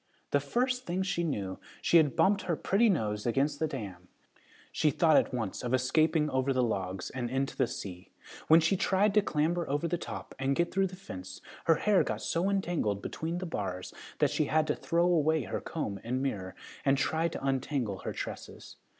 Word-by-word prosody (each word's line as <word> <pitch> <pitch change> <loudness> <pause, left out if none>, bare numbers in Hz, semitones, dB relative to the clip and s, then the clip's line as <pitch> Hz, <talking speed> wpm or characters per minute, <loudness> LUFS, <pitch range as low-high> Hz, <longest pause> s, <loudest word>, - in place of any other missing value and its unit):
The 145 - +4
first 250 - -1
thing 180 +2 0
she 190 -2 -1
knew 100 - -3 0.2
she 170 - +4
had 150 -4 +3
bumped 200 +1 +3
her 170 - 0
pretty 215 +8 +2
nose 105 - 0
against 140 +5 +1
the 160 - +1
dam. 100 -10 -7 0.6
She 155 - +2
thought 155 +2 +3
at - - +4
once 115 -6 -3
of 125 +1 +1
escaping 155 +4 +2
over 130 +1 +1
the 130 -1 +2
logs 95 -5 -2
and 125 -2 -3
into 135 +2 -1
the 130 - +2
sea. 90 -5 -7 0.4
When 160 +1 +8
she 165 +4 +2
tried 195 +2 +2
to 210 - +5
clamber 170 -1 0
over 145 +4 0
the 170 +1 -1
top - - -7
and 135 +1 +1
get 170 +3 +1
through 195 0 +2
the 185 - -10
fence, 95 - -9 0.3
her 165 - +5
hair 205 +3 +3
got - - -3
so 175 +4 0
entangled 170 - -1
between 165 +2 -3
the 185 - -4
bars 95 - -4 0.2
that - - +2
she 155 - +1
had 155 +1 +2
to - - 0
throw 170 +1 +1
away 160 -4 +3
her - - -4
comb 100 -1 -4
and 125 +3 -1
mirror 100 -9 -3 0.3
and 135 0 +3
try 160 +3 +1
to 155 - -6
untangle 130 -6 -1
her - - -4
tresses. - - -7
150 Hz, 200 wpm, -30 LUFS, 120-170 Hz, 0.6 s, When